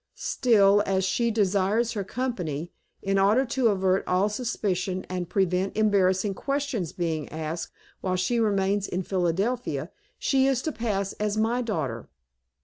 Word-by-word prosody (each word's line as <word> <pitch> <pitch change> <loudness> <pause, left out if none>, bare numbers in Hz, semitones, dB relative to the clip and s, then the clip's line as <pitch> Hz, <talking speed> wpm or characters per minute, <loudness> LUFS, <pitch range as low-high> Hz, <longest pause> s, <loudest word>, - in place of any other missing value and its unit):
Still, 205 -5 +3
as 190 -1 +1
she 235 +5 +1
desires 210 +2 +1
her 205 -4 -3
company, 180 - -3 0.3
in 195 0 +1
order 210 +7 +4
to 255 0 +1
avert 190 -2 +2
all 185 +3 +2
suspicion, 195 -5 -2
and 180 -2 -3
prevent 190 +1 0
embarrassing 200 -2 +2
questions 275 - -2
being 160 -4 -3
asked, 160 +1 -4 0.3
while 185 -1 -1
she 185 +6 +1
remains 200 -2 +1
in 185 +1 -2
Philadelphia 190 +7 -1 0.3
she 265 -1 +2
is 265 -2 +1
to 315 - -1
pass 200 -6 -2
as 210 0 -1
my 230 +3 +1
daughter." 155 - -3
195 Hz, 140 wpm, -26 LUFS, 185-225 Hz, 0.3 s, order